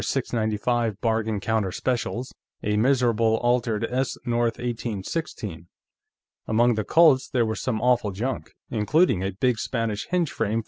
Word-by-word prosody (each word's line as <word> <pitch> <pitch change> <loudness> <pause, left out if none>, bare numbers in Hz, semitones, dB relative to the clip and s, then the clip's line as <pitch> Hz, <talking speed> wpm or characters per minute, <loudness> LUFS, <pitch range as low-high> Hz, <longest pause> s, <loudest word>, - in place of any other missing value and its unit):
95 110 -1 0
bargain 110 -2 0
counter 105 -1 0
specials, 125 +3 -2 0.3
a 105 -1 0
miserable 115 -2 +3
altered 120 -3 +1
S. 130 +1 -1
North 120 -1 0
1816. 110 - -4 0.8
Among 120 +2 +3
the 110 -1 -1
Colts, 150 -1 +4
there 120 -3 +2
was 110 0 -3
some 115 -4 -1
awful 125 -3 +2
junk, 115 +6 -3 0.2
including 115 - +2
a 95 - 0
big 120 +3 +1
Spanish 115 -4 -2
hinge 180 -4 0
frame 110 +3 -1
115 Hz, 135 wpm, -25 LUFS, 110-125 Hz, 0.8 s, Colts